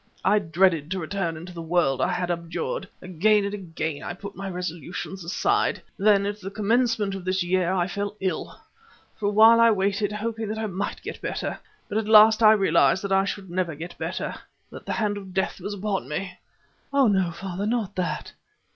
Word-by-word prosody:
I 210 +2 +5
dreaded 165 -4 +2
to 190 +1 -2
return 170 -1 -3
into 175 +3 -9
the 170 - -7
world 160 -6 +1
I - - +2
had 180 0 -1
abjured. 175 - -3 0.2
Again 200 +4 +2
and 200 - -3
again 165 -6 -4
I - - -5
put 200 +1 -9
my 195 0 -5
resolutions 180 +1 -5
aside. 400 - +1 0.2
Then 200 -1 +3
at 205 +1 -4
the 190 - -5
commencement 220 0 +1
of 195 -2 -6
this 185 0 0
year 180 0 +1
I 180 -2 +1
fell 200 +2 -4
ill. 190 -1 -3 0.6
For 205 - -1
a - - +1
while 225 +2 +7
I 230 0 +7
waited, 200 0 +1
hoping 220 +1 -3
that 215 +1 -3
I 220 - -2
might 200 -1 -4
get - - -7
better, - - -3 0.3
but 210 - -1
at 220 - -4
last 220 +1 +7
I 215 -1 +8
realized 190 -2 +3
that 200 - -3
I 195 0 +4
should 195 -2 -5
never 175 -3 -1
get 170 +4 -8
better, - - -3 0.4
that - - -11
the - - -1
hand 210 -3 0
of 190 -2 -10
Death 190 - -1
was 205 +3 -4
upon 195 - -3
me." 180 +4 -3 0.6
"Ah, 280 -1 +4
no, 190 -4 +2
father, 190 +3 -4
not 220 -4 -1
that!" 180 -1 -3
195 Hz, 200 wpm, -25 LUFS, 180-210 Hz, 0.6 s, I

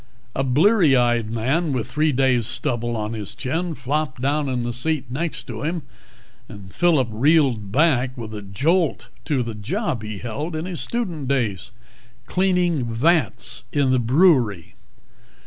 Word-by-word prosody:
A 135 - -1
bleary 155 - +4
eyed 120 -3 +2
man 135 +8 0
with 125 -4 -2
three 155 +1 +1
days' 130 -4 +2
stubble 120 -2 -1
on 105 +1 -3
his 105 -4 -6
chin 165 +5 -2
flopped 140 0 -2
down 140 +2 0
in 125 -2 -1
the 120 0 -3
seat 145 +3 -1
next 160 +5 -3
to - - -7
him, 165 +1 -2 0.7
and 100 -3 -11
Phillip 155 -9 +2
reeled 125 -4 +2
back 130 -2 +2
with 110 -2 -7
a 105 - -6
jolt 150 - 0 0.2
to 140 -6 0
the 115 -1 -5
job 125 - -3
he 110 0 -6
had 100 - -8
held 145 +8 -4
in 155 +2 -3
his 180 -3 -4
student 180 - -3
days, 115 - -1 0.6
cleaning 180 -7 +1
vats 115 -3 +1
in 140 -3 +2
the 130 - +3
brewery. 120 - +3
130 Hz, 160 wpm, -22 LUFS, 115-160 Hz, 0.7 s, bleary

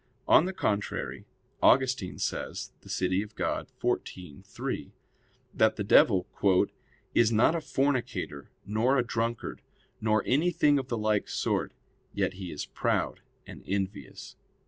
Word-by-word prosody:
On 160 - +6
the 190 - -2
contrary, 105 - -2 0.4
Augustine 130 -7 +3
says - - -3
(De - - -15
Civ. 95 +4 -1
Dei - - -1
xiv, 90 -6 -3
3) - - -5 0.6
that 110 0 +3
the 105 - -2
devil 95 -2 +5 0.9
"is 115 -1 +4
not 110 +7 +4
a 170 - -1
fornicator 135 - -1 0.2
nor 115 +6 +2
a 125 - +2
drunkard, 115 0 -3 0.4
nor 110 -1 +2
anything 145 0 +3
of 130 - -5
the 120 - -2
like 105 -1 0
sort; - - -1 0.4
yet - - 0
he 95 -2 -7
is 75 - -5
proud - - -1 0.3
and - - -11
envious." 100 +1 -4
110 Hz, 130 wpm, -29 LUFS, 100-130 Hz, 0.9 s, On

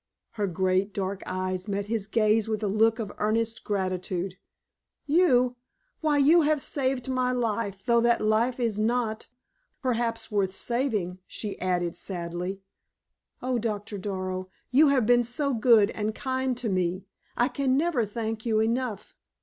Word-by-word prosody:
Her 210 -3 -2
great, 185 +2 0
dark 195 0 -2
eyes 185 +1 -3
met 200 0 -2
his 210 -1 -2
gaze 215 0 +2
with 215 -1 -2
a - - +1
look 220 +3 +3
of 215 -4 -4
earnest 225 +1 0
gratitude. 185 -2 -2 0.7
"You? 255 -6 +3 0.4
Why, 305 -2 +2
you 305 +5 +6
have 305 0 +2
saved 265 -2 -1
my 255 -1 +1
life, 215 -5 -2
though 235 -1 +4
that 235 0 +3
life 220 +4 +1
is 225 -4 0
not, 220 0 0 0.5
perhaps, 230 -3 -1
worth 195 -2 0
saving," 215 -8 -1
she 210 -2 -6
added, 175 -2 0
sadly. 180 +1 -4 0.8
"Oh, 255 -1 0
Doctor 210 -2 -3
Darrow, 185 -1 -4 0.2
you 290 +5 +6
have 270 -5 +3
been 240 +1 +5
so 275 +4 -1
good 225 -3 +5
and 215 0 -3
kind 260 -1 -1
to 245 -2 -3
me! 185 0 -1 0.3
I 240 - +3
can 270 -2 +1
never 305 -6 +1
thank 220 +1 -4
you 220 -2 +1
enough! 230 -1 -1
220 Hz, 150 wpm, -27 LUFS, 195-250 Hz, 0.8 s, you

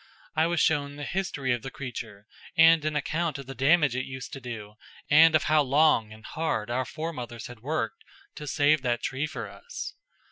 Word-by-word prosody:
I 160 +1 +3
was 170 -1 0
shown 145 -2 +1
the 145 - -7
history 145 -8 -1
of 120 - -2
the 135 - -6
creature, 115 -7 -7 0.3
and 165 -1 +7
an 155 0 -1
account 155 +1 -1
of 140 - -8
the 135 - -7
damage 140 +1 +3
it 130 - -1
used 130 -1 -7
to 135 - -7
do 110 -4 -7 0.4
and 160 +2 +7
of 155 - +3
how 155 +2 +4
long 140 -5 +3
and 110 +1 -13
hard 120 -9 -2
our 130 +2 0
foremothers 125 -6 -6
had 125 -2 -10
worked 130 -2 -3 0.3
to 150 - -8
save 145 +2 +3
that 120 -2 -1
tree 135 +3 -1
for 115 -7 -6
us. 100 0 -8
140 Hz, 200 wpm, -27 LUFS, 120-155 Hz, 0.4 s, and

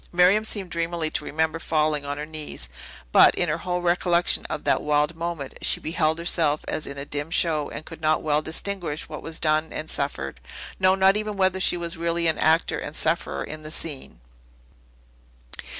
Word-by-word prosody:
Miriam 180 +4 +5
seemed 200 -5 -2
dreamily 165 -1 -1
to - - -2
remember 160 +2 -1
falling 155 -2 0
on 145 0 -3
her 150 - -4
knees; 155 - -6 0.4
but, - - +7
in 175 - +1
her 160 +2 -1
whole 180 +1 -2
recollection 175 0 +2
of 155 - -4
that - - +2
wild 150 +2 +1
moment, 165 -4 -5
she - - +2
beheld 160 -1 0
herself 165 -3 +1
as 155 - -2
in 140 - -6
a 140 - -5
dim 145 +1 -3
show, 155 -3 +1
and 155 - -7
could 165 -1 -10
not 155 0 +2
well 150 -1 +2
distinguish 165 0 -3
what - - -7
was 165 0 -2
done 155 0 +1
and 155 - -4
suffered; 70 - -2 0.4
no, 185 0 +5
not 190 +1 +4
even 210 -1 -3
whether 190 -1 +2
she 180 - +2
were 170 -1 -4
really 170 0 -1
an 160 -1 +2
actor 160 0 +3
and 145 - -6
sufferer 165 +1 0
in 155 0 -7
the 155 - -8
scene. 145 - -4
160 Hz, 190 wpm, -25 LUFS, 150-175 Hz, 0.4 s, but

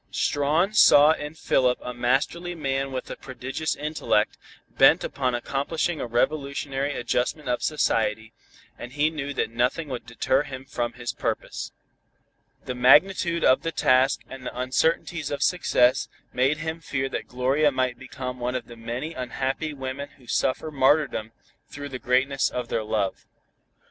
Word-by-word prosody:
Strawn 155 +8 +1
saw 150 -7 +7
in 150 0 -4
Philip 125 -5 +2
a 125 - -6
masterly 140 +9 0
man 135 -3 -2
with 130 -1 -5
a - - -4
prodigious 135 +4 -4
intellect, 150 -8 0 0.3
bent - - +5
upon 130 -3 -1
accomplishing 150 +6 -2
a - - -3
revolutionary 140 +2 -1
adjustment 125 +5 -1
of 125 0 0
society, 110 -7 0 0.5
and 120 +1 -8
he 150 +2 +2
knew 145 -3 -4
that - - -1
nothing 125 +7 0
would 125 -2 -6
deter 130 +3 +1
him 135 -3 -8
from 120 -3 -3
his 120 -1 -5
purpose. - - -3 0.9
The 125 - -3
magnitude 170 +7 +4
of 130 - +5
the 165 - -2
task 130 -3 +3
and 130 -1 -10
the 125 - -6
uncertainties 150 +4 0
of 140 -1 -1
success 125 -8 +3 0.3
made 130 +4 +2
him 160 +1 -4
fear 135 -4 -2
that - - -4
Gloria 135 +4 +2
might 130 -2 -1
become 130 -1 -6
one 125 +1 -2
of 125 -3 -3
the 120 - -12
many 120 +7 -5
unhappy 135 +4 -3
women 140 0 -5
who 130 - -20
suffer 130 +6 -1
martyrdom 135 -5 +2 0.4
through 145 0 -7
the 130 -2 -6
greatness 135 +3 +1
of 125 -1 -4
their 110 - -1
love. 105 -3 -2
135 Hz, 155 wpm, -25 LUFS, 125-150 Hz, 0.9 s, saw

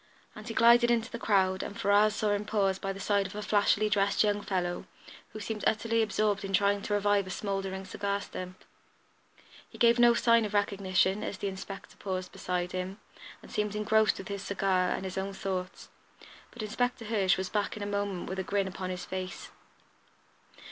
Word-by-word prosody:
And 215 +1 -10
he 225 - -5
glided 235 +1 +6
into 235 0 +1
the 235 - -5
crowd 190 -4 +2
and 205 - -6
Ferrars 205 +1 +4
saw 215 -1 0
him 205 0 0
pause 195 -3 0
by 195 - -3
the 195 - -7
side 200 0 +1
of 195 - -11
a 210 - -4
flashily 205 0 +3
dressed 200 -1 +2
young 205 -1 +1
fellow, 180 -3 -2 0.4
who 215 - -8
seemed 215 0 -4
utterly 230 +1 +1
absorbed 210 -2 0
in 195 0 -5
trying 200 +1 +3
to 205 - -1
revive 205 -1 +2
a - - -7
smouldering 195 -1 -3
cigar 200 +1 -2
stump. 185 -2 -8 1.0
He - - -13
gave 235 0 +4
no 240 -1 +6
sign 230 -1 +4
of 210 -1 -3
recognition 200 -1 +1
as 195 - -4
the 200 - -2
inspector 195 0 -9
paused 185 -2 -4
beside 180 0 -3
him, 185 +2 -4 0.4
and - - -13
seemed 210 0 -1
engrossed 215 +1 +3
with 195 - -8
his 200 -1 -4
cigar 190 -2 +1
and 190 - -2
his 190 0 -3
own 195 +1 -4
thoughts, 190 -1 -4 0.6
but 240 - -8
Inspector 245 +2 -1
Hirsch 200 -4 +2
was 190 0 -3
back 210 0 -1
in 205 - -5
a - - -3
moment 200 -2 -2
with 190 +1 -4
a - - -1
grin 200 +1 0
upon 185 0 -5
his 180 -1 -5
face. 185 0 -6
200 Hz, 195 wpm, -30 LUFS, 190-210 Hz, 1.0 s, glided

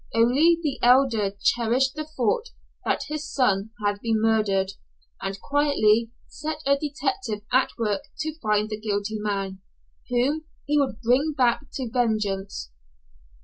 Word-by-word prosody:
Only 280 +9 +4
the 300 -5 -2
Elder 245 -5 +4
cherished 245 +3 +2
the 310 0 -5
thought 370 - -1 0.4
that - - 0
his 305 0 -5
son 210 -6 +1 0.2
had 205 0 0
been 225 -2 +1
murdered, 210 -4 +2 0.5
and 195 0 -4
quietly 235 -6 +2 0.2
set 310 0 -5
a 280 0 +4
detective 270 -6 -3
at 260 +1 +3
work 210 -4 -1 0.2
to 315 +1 -4
find 215 -3 +1
the 215 - -3
guilty 210 0 -2
man 195 -2 -3 0.5
whom 270 +6 +1 0.2
he 295 +1 +2
would 265 -6 -1
bring 260 +6 +2
back 250 +2 +2
to 260 -2 -3
vengeance. 215 - -1
240 Hz, 140 wpm, -25 LUFS, 210-285 Hz, 0.5 s, Only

